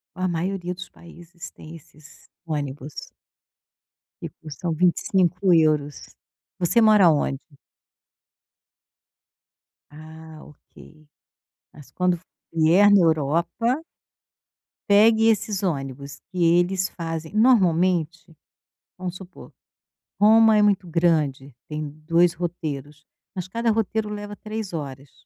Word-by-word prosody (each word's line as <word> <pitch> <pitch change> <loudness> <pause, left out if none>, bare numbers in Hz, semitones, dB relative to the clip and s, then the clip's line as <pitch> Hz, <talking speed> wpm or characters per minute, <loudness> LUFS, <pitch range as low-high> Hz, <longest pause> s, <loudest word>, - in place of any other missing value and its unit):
A 185 0 -2
maioria 180 +1 -3
dos 185 +1 -10
países 170 0 -13
tem 160 +2 -12
esses 155 -1 -18 0.2
ônibus 145 -2 -6 1.1
que - - -6
custam 160 +2 -5
25 180 +2 +1
euros. 155 -3 +2 0.6
Você 185 +7 +2
mora 215 -3 +5
aonde? 145 -4 +2 2.5
Ah, 160 +1 -13
ok. 155 +1 -18 0.7
Mas 145 -3 -16
quando 180 -1 0
f 170 - -15 0.3
vier 165 +5 +4
na 200 -2 +6
Europa 170 - 0 1.0
pegue 220 +2 +5
esses 210 -2 -2
ônibus 140 -5 -4
que 180 -2 -1
eles 175 +3 +2
fazem 165 -1 -6
normalmente, 180 -7 +2 0.6
vamos 180 -1 -5
supor, 185 0 -13 0.7
Roma 220 +1 +6
é - - +4
muito 200 -3 +2
grande. 155 -6 0
Tem 150 0 -5 0.2
2 170 +1 +3
roteiros. 150 -4 -6 0.3
Mas 185 -2 -5
cada 230 +4 -1
roteiro 220 0 -1
leva 205 0 -7
3 215 -1 -6
horas. 140 -3 -7
175 Hz, 105 wpm, -23 LUFS, 155-195 Hz, 2.5 s, na